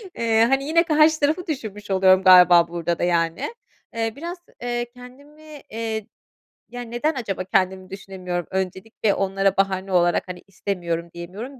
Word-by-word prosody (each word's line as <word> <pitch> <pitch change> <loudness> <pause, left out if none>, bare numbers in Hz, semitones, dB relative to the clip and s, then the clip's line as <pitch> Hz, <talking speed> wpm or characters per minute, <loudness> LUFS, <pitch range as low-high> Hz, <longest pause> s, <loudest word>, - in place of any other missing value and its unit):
eee, 225 -1 +3
hani, 270 0 +2
yine 335 +3 +3
karşı 310 -1 +4
tarafı 310 +5 0
düşünmüş 210 -9 -5
oluyorum 190 0 +4
galiba 180 -2 +7
burada 170 0 -3
da, - - -1
yani. 170 - 0 0.4
Eee, 225 -1 -1
biraz, 340 +5 -6 0.2
eee, 240 0 -2
kendimi, 285 +4 -14
eee, 220 -1 -4 0.6
ya, 245 0 -7
neden 240 +7 -2
acaba 200 -7 -3
kendimi 185 0 0
düşünemiyorum? 185 -3 -5
Öncelikle 190 +3 -2
onlara 195 0 0
bahane 195 0 0
olarak, 175 0 +2
hani, 180 -1 -8
"İstemiyorum." 175 -4 -4
diyemiyorum, 205 +10 -8
195 Hz, 145 wpm, -22 LUFS, 185-250 Hz, 0.6 s, galiba